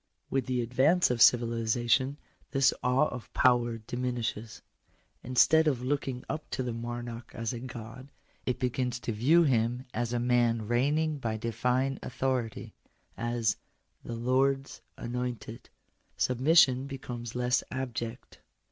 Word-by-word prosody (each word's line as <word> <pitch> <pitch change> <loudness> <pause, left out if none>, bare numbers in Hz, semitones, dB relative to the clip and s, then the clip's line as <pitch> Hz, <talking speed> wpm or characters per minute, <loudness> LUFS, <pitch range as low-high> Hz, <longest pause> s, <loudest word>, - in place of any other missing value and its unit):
With 135 -2 0
the 125 -1 0
advance 135 +8 +3
of 120 -2 -1
civilization 120 +3 +3 0.3
this 135 -1 +3
awe 125 +4 +3
of 125 -5 -8
power 120 -2 +3
diminishes. 115 -2 -4 0.6
Instead 160 +5 +4
of 130 -5 0
looking 130 -2 -2
up 155 - -5
to 130 - -1
the 120 -2 -3
monarch 120 0 -6
as 115 0 -3
a 120 - -5
God, 125 +2 -9 0.4
it 125 - 0
begins 125 -1 -1
to - - -3
view 140 +11 +4
him 125 -2 +1
as 120 -1 -2
a 120 - 0
man 120 -2 +2
reigning 145 +6 +1
by 110 -4 -2
divine 125 +4 0
authority 125 -3 -2 0.3
— - - -39 0.2
as 115 -3 +1 0.2
" - - -45
the 120 - -5
Lords 135 +3 0 0.2
anointed." 120 -2 -5 0.5
Submission 130 0 +4
becomes 125 -4 -7
less 125 +1 +1
abject. 120 -2 -5
125 Hz, 135 wpm, -29 LUFS, 120-130 Hz, 0.6 s, Instead